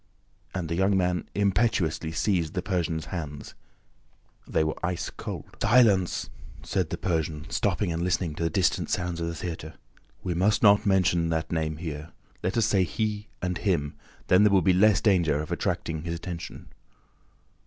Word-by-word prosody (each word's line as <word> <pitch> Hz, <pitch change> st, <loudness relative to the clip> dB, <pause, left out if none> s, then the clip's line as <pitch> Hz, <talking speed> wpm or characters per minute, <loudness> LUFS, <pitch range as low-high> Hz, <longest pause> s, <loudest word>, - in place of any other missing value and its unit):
And 90 Hz, -3 st, -2 dB
the 85 Hz, -, -2 dB
young 95 Hz, +3 st, +2 dB
man 90 Hz, -1 st, 0 dB
impetuously 95 Hz, -6 st, +1 dB
seized 85 Hz, -2 st, 0 dB
the 90 Hz, -, -1 dB
Persian's 85 Hz, -5 st, -1 dB
hands. 75 Hz, -5 st, -6 dB, 0.9 s
They -, -, +1 dB
were 80 Hz, -, -3 dB
ice 85 Hz, 0 st, -2 dB
cold. -, -, -7 dB
"Silence!" 105 Hz, -6 st, +3 dB, 0.3 s
said 85 Hz, +1 st, -1 dB
the 85 Hz, -, -3 dB
Persian, 80 Hz, -3 st, -2 dB
stopping 100 Hz, -2 st, 0 dB
and 85 Hz, 0 st, -2 dB
listening 90 Hz, -2 st, 0 dB
to 85 Hz, -, -4 dB
the 85 Hz, -, +1 dB
distant 95 Hz, -2 st, +1 dB
sounds 85 Hz, -1 st, -2 dB
of 85 Hz, -, -1 dB
the 85 Hz, -, -4 dB
theater. 80 Hz, -2 st, -6 dB, 0.5 s
"We 90 Hz, -, -1 dB
must 100 Hz, +5 st, +2 dB
not 105 Hz, +1 st, +6 dB
mention 90 Hz, -3 st, +3 dB
that 80 Hz, 0 st, -2 dB
name 80 Hz, -2 st, -1 dB
here. 80 Hz, -1 st, -6 dB, 0.3 s
Let 95 Hz, +5 st, -1 dB
us 115 Hz, -, +4 dB
say 100 Hz, -3 st, +3 dB
'he' 105 Hz, +5 st, -2 dB, 0.2 s
and 90 Hz, -1 st, -1 dB
'him;' 80 Hz, -8 st, 0 dB, 0.3 s
then 90 Hz, +2 st, +5 dB
there 105 Hz, -, +5 dB
will 95 Hz, -3 st, +4 dB
be 95 Hz, -, +4 dB
less 100 Hz, +2 st, +4 dB
danger 85 Hz, -8 st, +3 dB
of 75 Hz, -, -5 dB
attracting 80 Hz, -1 st, -2 dB
his 85 Hz, +1 st, -3 dB
attention." 85 Hz, 0 st, -7 dB
90 Hz, 170 wpm, -27 LUFS, 80-95 Hz, 0.9 s, not